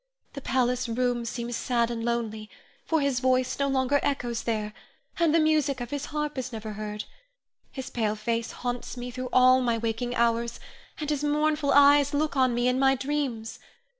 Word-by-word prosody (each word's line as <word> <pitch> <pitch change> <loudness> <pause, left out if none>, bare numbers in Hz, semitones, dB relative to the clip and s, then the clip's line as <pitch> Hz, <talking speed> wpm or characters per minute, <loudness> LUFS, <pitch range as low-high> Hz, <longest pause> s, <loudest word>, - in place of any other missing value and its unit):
The 280 - -7
palace 250 -2 0
rooms 240 0 0
seem 235 0 -5
sad 240 0 0
and 230 -1 -4
lonely, 225 -2 -2 0.4
for 320 -2 +1
his 280 -3 +1
voice 255 0 +1
no 280 - +2
longer 270 +1 +2
echoes 240 -4 -1
there, 215 -2 -2 0.5
and 335 -2 +3
the 330 - +4
music 305 -4 +2
of 245 -1 -6
his 285 0 -3
harp 300 -2 -3
is 255 0 -5
never 220 -2 -6
heard. 210 0 -5 0.7
His 265 -2 -7
pale 215 -3 0
face 230 +2 -2
haunts 245 0 -5
me 245 0 -5
through 255 0 -5
all 255 0 +6
my 235 -2 +1
waking 230 +2 -2
hours, 235 0 +1 0.4
and 300 - -3
his 295 -1 -1
mournful 300 0 +1
eyes 285 0 +6
look 300 0 0
on 255 -3 +3
me 240 +1 +1
in 250 +1 +2
my 270 0 +4
dreams. 265 -5 -3
250 Hz, 185 wpm, -27 LUFS, 235-280 Hz, 0.7 s, all